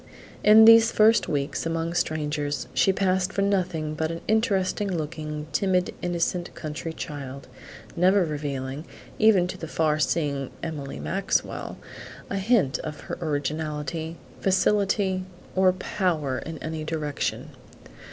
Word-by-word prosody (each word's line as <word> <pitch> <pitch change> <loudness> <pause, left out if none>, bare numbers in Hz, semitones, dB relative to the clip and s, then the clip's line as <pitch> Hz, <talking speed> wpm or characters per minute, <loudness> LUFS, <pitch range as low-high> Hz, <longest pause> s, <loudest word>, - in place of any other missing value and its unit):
In 215 +1 +8
these 230 0 +8
first 220 +1 +4
weeks 140 0 -1
among 165 0 -2
strangers 150 -3 -1
she 195 - +4
passed 190 -1 +1
for 195 - 0
nothing 180 -6 0
but 160 +1 -1
an 165 0 -5
interesting 205 -2 +1
looking, 155 -2 -4
timid, 185 -2 +1
innocent, 175 0 -1
country 155 +1 -5
child, 140 -4 -7 0.5
never 185 +2 +4
revealing, 145 -1 -4 0.3
even 215 -5 +5
to 180 - -6
the 165 - -5
far 155 -1 +1
seeing 145 -4 0
Emily 145 -4 -5
Maxwell, 195 +3 -2 0.5
a 200 - -1
hint 195 - +2
of 155 -1 -6
her - - -6
originality, 155 +1 -3 0.2
facility, 195 -1 +2 0.3
or 190 0 +5
power 170 -7 -1
in 160 0 -7
any 160 -1 -4
direction. 155 -2 -3
165 Hz, 125 wpm, -25 LUFS, 150-190 Hz, 0.5 s, In